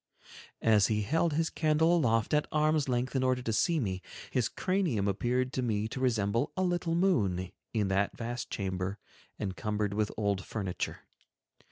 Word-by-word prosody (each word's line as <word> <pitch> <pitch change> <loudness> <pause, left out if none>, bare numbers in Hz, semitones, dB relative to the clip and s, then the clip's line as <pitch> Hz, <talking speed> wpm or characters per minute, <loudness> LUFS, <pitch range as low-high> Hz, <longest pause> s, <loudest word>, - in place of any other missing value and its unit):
As 105 -3 +5
he 105 -1 0
held 160 +7 +1
his 160 +2 0
candle 160 +2 +3
aloft 115 -8 +2
at 150 0 +2
arm's 155 -2 +2
length 125 +2 -1
in 130 - +2
order 130 -1 +1
to 115 - -1
see 165 +9 +2
me, 95 -7 -2 0.3
his 125 -3 +1
cranium 180 - 0
appeared 125 +6 0
to 130 - -1
me 110 -3 0
to 130 - -5
resemble 115 0 +1
a 185 - +2
little 175 -2 0
moon, 100 - +1 0.2
in 105 -3 +1
that 100 +1 0
vast 120 +1 -4
chamber 95 0 -3 0.4
encumbered 105 +1 -2
with 105 0 0
old 100 -3 0
furniture. 95 -5 -4
115 Hz, 165 wpm, -30 LUFS, 105-150 Hz, 0.4 s, As